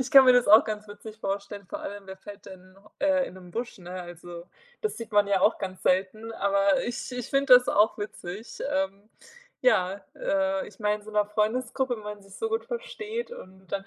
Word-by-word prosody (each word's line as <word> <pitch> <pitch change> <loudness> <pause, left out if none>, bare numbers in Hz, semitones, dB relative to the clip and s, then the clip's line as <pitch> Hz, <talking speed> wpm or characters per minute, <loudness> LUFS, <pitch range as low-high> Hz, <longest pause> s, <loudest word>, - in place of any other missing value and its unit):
Ich 260 0 -2
kann 270 -1 +10
mir 255 - +8
das 245 -1 +4
auch 215 +2 +9
ganz 215 -1 -5
witzig 210 +1 -10
vorstellen, 200 -1 -4
vor - - -6
allem 200 -1 -7
wer 190 - -8
fällt 200 +1 -12
denn, 185 0 -13 0.2
äh, 280 -2 +2
in - - -10
'nen 180 -1 -12
Busch, 235 +6 -4
ne? 180 0 -9
Also, 175 0 -10 0.3
das 435 - -2
sieht 230 -1 -8
man 205 -1 +5
ja 195 -2 +3
auch 215 - +4
ganz 185 -1 -6
selten. 200 +5 +1
Aber 200 -2 +2
ich 245 +1 -4
ich 245 -2 -4
finde 275 -2 +6
das 250 0 +6
auch 210 +2 +3
witzig. 205 0 -7
Ähm, 195 +2 -2 0.5
ja, 195 - +3
äh, 195 0 0
ich 190 - -14
meine, 210 0 +2
in 210 - -14
so 215 - -11
'ner 210 -1 +2
Freundesgruppe, 245 +4 0
wenn 215 - -10
man 210 -1 -7
sich 195 -1 -16
so 450 - -2
gut 450 0 -1
versteht 475 -1 -5
und 190 - -12
dann 195 +1 -3
210 Hz, 215 wpm, -27 LUFS, 195-245 Hz, 0.5 s, kann